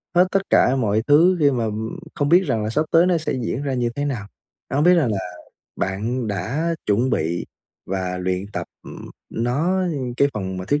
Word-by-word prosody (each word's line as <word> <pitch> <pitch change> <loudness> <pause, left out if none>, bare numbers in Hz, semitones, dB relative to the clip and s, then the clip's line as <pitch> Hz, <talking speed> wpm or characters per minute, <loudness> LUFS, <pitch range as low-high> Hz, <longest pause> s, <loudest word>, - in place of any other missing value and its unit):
hết 180 +1 +5
tất 195 - +2
cả 130 - +4
mọi 110 -4 +1
thứ 170 +5 +5
khi 145 -1 +5
mà 120 -3 -1 0.5
không 145 0 0
biết 180 +3 +6
rằng 110 -2 0
là 105 - -2
sắp 150 +8 0
tới 170 +2 +6
nó 180 -2 +3
sẽ 155 - -2
diễn 125 +4 -2
ra 140 -2 -1
như 120 -2 0
thế 145 0 -2
nào? 120 -8 -3 0.4
Đó 135 - -1
hông 145 - +3
biết 180 - +7
rằng 145 -10 +2
là 100 - -1 0.6
bạn 110 +6 -2
đã 130 - -1
chuẩn 115 +6 +2
bị 85 -2 -1 0.4
và 90 -1 -2
luyện 90 +1 -2
tập, - - -4 0.2
ừm, - - -10 0.2
nó 140 +11 0 0.4
cái 140 - +4
phần 95 -3 -4
mà 90 - -5
thuyết 145 +9 +1
125 Hz, 210 wpm, -22 LUFS, 100-150 Hz, 0.6 s, biết